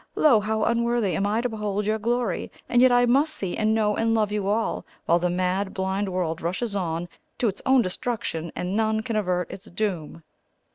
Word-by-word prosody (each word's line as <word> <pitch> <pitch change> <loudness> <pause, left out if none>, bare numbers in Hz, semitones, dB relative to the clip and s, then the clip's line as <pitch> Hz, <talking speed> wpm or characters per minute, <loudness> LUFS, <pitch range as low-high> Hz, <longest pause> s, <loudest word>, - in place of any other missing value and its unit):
Lo, 270 -8 +5
how 215 +1 -1
unworthy 235 -5 +1
am 200 +3 0
I 215 +3 +1
to 245 - -1
behold 210 -2 -2
your 215 +1 0
glory! 235 -3 -1 0.2
and 245 - +3
yet 255 0 +6
I 245 0 +5
must 280 +6 +3
see 190 -3 -3
and 215 0 +1
know 210 -2 +2
and 225 0 +1
love 215 -2 +1
you 205 -2 -1
all, 220 +3 0 0.2
while 170 +1 +3
the 180 +1 0
mad 185 +2 -1
blind 190 +1 -1
world 175 -3 -2
rushes 200 +6 -2
on 170 -2 -2 0.3
to 240 - +1
its 200 - -3
own 260 -2 +5
destruction, 185 -5 -3
and 180 +2 -2
none 220 0 +1
can 230 -2 -3
avert 180 -4 0
its 195 - -9
doom.'" 175 -6 -3
210 Hz, 205 wpm, -25 LUFS, 185-230 Hz, 0.3 s, yet